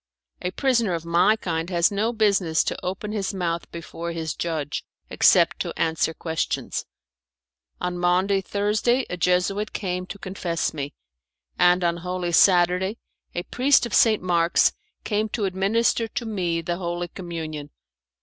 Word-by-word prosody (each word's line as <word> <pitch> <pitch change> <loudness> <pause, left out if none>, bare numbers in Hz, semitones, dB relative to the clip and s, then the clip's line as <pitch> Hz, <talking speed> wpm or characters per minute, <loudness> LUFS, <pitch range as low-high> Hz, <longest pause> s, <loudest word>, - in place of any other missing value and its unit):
A 180 - -1
prisoner 230 -3 +1
of 165 0 -6
my 170 +6 +4
kind 165 -5 -3
has 175 +2 +2
no 210 +3 0
business 200 -8 +2
to - - -4
open 195 +3 -4
his 200 -2 -2
mouth 170 -2 -2
before 170 0 -6
his 160 -2 -3
judge, 155 -4 -3 0.3
except - - +4
to - - -4
answer 160 0 +1
questions. 160 0 -3 0.9
On 180 0 -3
Maundy 185 +3 +2
Thursday 210 +6 +1
a - - -1
Jesuit 180 +4 +1
came 180 -2 -3
to 200 - -7
confess 185 -4 -3
me, 145 -1 -5 0.6
and 180 0 +5
on 170 0 +1
Holy 180 0 -3
Saturday 180 +3 +4 0.4
a 175 - -2
priest 260 +4 +3
of 235 - -6
St. 220 -4 +4
Mark's 170 -2 +3 0.3
came 215 0 -1
to 210 -1 -2
administer 205 +5 +1
to 240 +1 -4
me 180 -6 -1
the 175 +1 -2
Holy 175 -1 -3
Communion. 160 -5 -6
180 Hz, 150 wpm, -24 LUFS, 170-205 Hz, 0.9 s, and